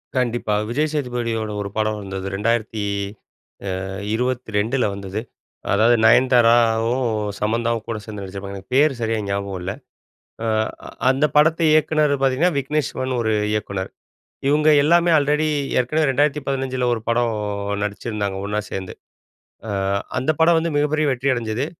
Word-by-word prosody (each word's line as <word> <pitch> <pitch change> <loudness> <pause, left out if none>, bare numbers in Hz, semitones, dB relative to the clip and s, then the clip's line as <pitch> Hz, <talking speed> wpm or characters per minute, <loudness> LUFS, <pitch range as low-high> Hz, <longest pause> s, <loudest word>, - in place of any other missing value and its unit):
கண்டிப்பா. 120 -4 0 0.2
விஜய் 150 +5 0
சேதுபதியோட 120 -6 -2
ஒரு 100 - -4
படம் 110 0 0
வந்தது 95 -1 -5
2022ல 105 +2 -2
வந்தது. 100 +2 -5 0.5
அதாவது 110 +4 +5
நயன்தாராவும், 120 0 +4 0.4
சமந்தாவும் 115 +1 -1
கூட 115 - -3
சேர்ந்து 105 -2 -7
நடிச்சிருப்பாங்க. 100 +1 -7
எனக்கு 95 +6 -10
பேர் 145 +1 +5
சரியா 115 0 0
ஞாபகம் 100 -1 -3
இல்ல. 95 +2 -3 0.7
அ - - -2 0.6
அந்த 135 +3 +3
படத்தை 160 +2 +4
இயக்குனது 155 -2 +3
பார்த்தீங்கன்னா 135 +7 +2
விக்னேஷ் 140 +1 -1
சிவன்னு 130 -1 -2
ஒரு 110 -1 +1 0.2
இயக்குனர். 100 -3 -3 0.6
இவங்க 150 +1 +4
எல்லாமே 170 +2 +4
ஆல்ரெடி 150 +2 +2 0.3
ஏற்கனவே 150 +4 +1
2015ல 135 -2 0
ஒரு 115 - -2
படம் 115 -1 +1 0.5
நடிச்சிருந்தாங்க 105 -1 -3
ஒன்னா 105 +1 -1
சேர்ந்து. 95 -1 -5 0.7
அ - - -5 0.5
அந்த 130 +5 +1
படம் 165 +1 +5
வந்து 165 0 -2
மிகப்பெரிய 150 +1 +1
வெற்றி 130 +2 0
அடைஞ்சது. 115 +2 -2
120 Hz, 125 wpm, -21 LUFS, 105-140 Hz, 0.7 s, அதாவது